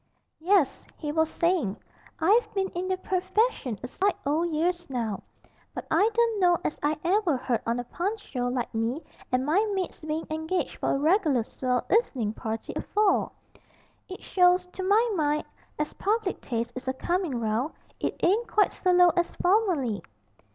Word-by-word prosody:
'Yes,' 345 Hz, -3 st, +2 dB
he 300 Hz, -2 st, -3 dB
was 320 Hz, +1 st, +2 dB
saying, 335 Hz, -, 0 dB, 0.4 s
'I've 430 Hz, +7 st, +3 dB
been 385 Hz, -1 st, 0 dB
in 360 Hz, +2 st, -4 dB
the 375 Hz, 0 st, 0 dB
purfession 370 Hz, -, 0 dB
a -, -, -3 dB
sight 390 Hz, +9 st, 0 dB
o' 295 Hz, +3 st, +1 dB
years 345 Hz, +1 st, -1 dB
now, 230 Hz, -6 st, -2 dB, 0.5 s
but -, -, -5 dB
I 425 Hz, -, +4 dB
don't 460 Hz, -1 st, +1 dB
know 350 Hz, -2 st, +4 dB
as -, -, -2 dB
I 300 Hz, +1 st, +1 dB
ever 355 Hz, -4 st, +2 dB
heard 245 Hz, -2 st, -1 dB
on 235 Hz, +1 st, 0 dB
a -, -, -2 dB
Punch's 395 Hz, -, -3 dB
show 245 Hz, -2 st, -2 dB
like 245 Hz, -1 st, -2 dB
me 230 Hz, +7 st, -1 dB, 0.3 s
and 255 Hz, +1 st, +1 dB
my 340 Hz, +8 st, +3 dB
mate's 370 Hz, -4 st, -4 dB
bein' 310 Hz, +1 st, -3 dB
engaged 315 Hz, +4 st, -2 dB
for -, -, -1 dB
a -, -, +1 dB
reg'lar 305 Hz, -, +3 dB
swell 250 Hz, +1 st, -2 dB
evenin' 260 Hz, -, +1 dB
party 220 Hz, 0 st, -5 dB
afore. 420 Hz, -2 st, +1 dB, 0.8 s
It 375 Hz, -, -8 dB
shows, 360 Hz, 0 st, +4 dB
to -, -, -5 dB
my 415 Hz, +5 st, +3 dB
mind, 300 Hz, -4 st, 0 dB, 0.3 s
as 300 Hz, 0 st, -2 dB
public 415 Hz, -1 st, -1 dB
taste 235 Hz, -1 st, -3 dB
is 255 Hz, +1 st, -7 dB
a 260 Hz, -, +1 dB
coming 345 Hz, -2 st, -1 dB
round 230 Hz, +6 st, -1 dB, 0.3 s
it -, -, -2 dB
ain't 430 Hz, +7 st, +3 dB
quite 415 Hz, -, +3 dB
so 365 Hz, -, 0 dB
low 355 Hz, 0 st, +7 dB
as 345 Hz, 0 st, 0 dB
formerly.' 355 Hz, -, +1 dB
335 Hz, 170 wpm, -27 LUFS, 260-380 Hz, 0.8 s, low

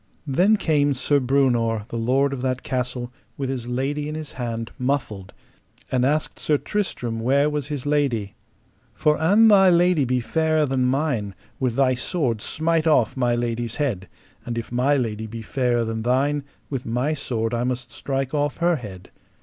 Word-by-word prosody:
Then 180 Hz, +10 st, +3 dB
came 145 Hz, -6 st, +2 dB
Sir 145 Hz, +3 st, +2 dB
Breunor, 120 Hz, -5 st, +1 dB
the -, -, -6 dB
lord 130 Hz, +5 st, +1 dB
of 130 Hz, -, -4 dB
that 130 Hz, -1 st, -2 dB
castle, 125 Hz, -1 st, -3 dB, 0.2 s
with 135 Hz, -1 st, -2 dB
his 125 Hz, -3 st, -4 dB
lady 140 Hz, +4 st, -2 dB
in 155 Hz, -, -5 dB
his 155 Hz, -2 st, -6 dB
hand, 115 Hz, -2 st, -4 dB
muffled, 125 Hz, -8 st, -2 dB, 0.6 s
and 125 Hz, -1 st, +2 dB
asked 150 Hz, +4 st, 0 dB
Sir 150 Hz, -, +1 dB
Tristram 125 Hz, -, -3 dB
where 140 Hz, +5 st, +2 dB
was 145 Hz, -2 st, -3 dB
his 145 Hz, -3 st, -4 dB
lady: 135 Hz, -9 st, 0 dB, 0.6 s
For 150 Hz, 0 st, +2 dB
an 205 Hz, +8 st, +5 dB
thy 195 Hz, -3 st, +7 dB
lady 175 Hz, -3 st, +4 dB
be 125 Hz, 0 st, +1 dB
fairer 155 Hz, +4 st, +1 dB
than 130 Hz, -2 st, 0 dB
mine, 125 Hz, -7 st, 0 dB, 0.2 s
with 125 Hz, -3 st, 0 dB
thy 135 Hz, -1 st, +3 dB
sword 125 Hz, -, -1 dB
smite 160 Hz, +3 st, 0 dB
off 125 Hz, -8 st, +3 dB
my 120 Hz, -2 st, +1 dB
lady's 120 Hz, -1 st, -2 dB
head; 115 Hz, -11 st, -2 dB, 0.4 s
and 120 Hz, -1 st, -4 dB
if 115 Hz, -, -5 dB
my 130 Hz, +4 st, +2 dB
lady 110 Hz, -3 st, -2 dB
be 115 Hz, +1 st, -7 dB
fairer 120 Hz, 0 st, 0 dB
than 110 Hz, 0 st, -3 dB
thine, 140 Hz, +4 st, +1 dB, 0.2 s
with 135 Hz, -3 st, -4 dB
my 125 Hz, +5 st, -1 dB
sword 120 Hz, -6 st, -2 dB
I 120 Hz, 0 st, 0 dB
must 125 Hz, 0 st, -3 dB
strike 135 Hz, -1 st, -3 dB
off 145 Hz, -2 st, 0 dB
her 170 Hz, -1 st, +2 dB
head. 95 Hz, -7 st, -10 dB
130 Hz, 175 wpm, -23 LUFS, 120-145 Hz, 0.6 s, thy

